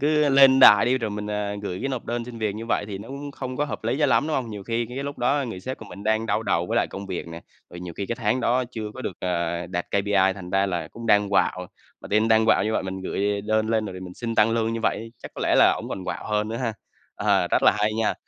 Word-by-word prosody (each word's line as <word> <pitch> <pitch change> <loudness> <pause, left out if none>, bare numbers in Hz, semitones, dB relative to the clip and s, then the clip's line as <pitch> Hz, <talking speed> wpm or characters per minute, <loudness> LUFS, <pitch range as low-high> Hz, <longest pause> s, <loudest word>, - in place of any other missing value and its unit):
cứ 150 0 +3
lên 135 -1 +6
đài 105 -5 +9
đi 130 +1 +2
rồi 110 -3 -3
mình, 105 0 -5
à, 105 -1 -2
gửi 90 -2 -4
cái 135 - -2
nộp 130 -3 -4
đơn 120 0 -3
xin 120 -1 -9
việc 105 -2 -1
như 115 +1 -6
vậy 115 - 0
thì 100 -2 -6
nó 110 - -10
cũng 140 +2 -7
không 130 -2 -6
có 145 - +1
hợp 140 - -6
lý 120 +5 0
cho 150 - +3
lắm, 140 +3 +3
đúng 155 - 0
hông? 125 -4 -3
Nhiều 105 -2 -7
khi 115 +2 -2
cái 125 +3 -9
cái 140 - -3
lúc 145 0 -6
đó 140 +3 +1
người 95 -5 -6
sếp 130 +6 -5
của 110 - -10
mình 100 0 -10
đang 110 +1 +1
đau 105 +1 0
đầu 85 -4 0
với - - -2
lại - - +3
công 100 0 -7
việc 90 -3 -5
nè, 85 0 -8 0.3
rồi 85 - -9
nhiều 90 -1 -7
khi 100 - -3
cái 120 - -3
tháng 120 +1 0
đó 125 +2 +1
chưa 110 -3 -5
có 130 - -7
được, 90 - -4
ờ, 85 -1 -2
đạt 90 0 -3
KPI, 100 -1 +2
thành 90 -3 -9
ra 95 +1 +2
là 85 -4 -3
cũng 115 +5 -9
đang 105 -1 +4
quạu. 90 -2 +1 0.3
Mà - - -10
team 110 +2 +2
đang 110 0 +4
quạu 105 - +4
như 110 - -1
vậy - - 0
mình 95 0 -5
gửi 100 +2 -1
đơn 110 +1 0
lên 110 -1 +1
rồi 95 - -7
thì 95 - -8
mình 90 -1 -9
xin 115 -1 -4
tăng 105 +1 +4
lương 115 0 0
như 115 - -3
vậy, 115 +1 -1
chắc - - -8
có - - -7
lẽ - - +2
là - - +6
ổng - - -7
còn 95 - -5
quạu - - -5
hơn 105 0 0
nữa 115 - -3
ha? 120 -2 -2 0.4
Ờ, - - +1
rất - - +2
là - - +6
hay 105 +1 +1
nha. 110 0 0
110 Hz, 310 wpm, -24 LUFS, 100-120 Hz, 0.4 s, đài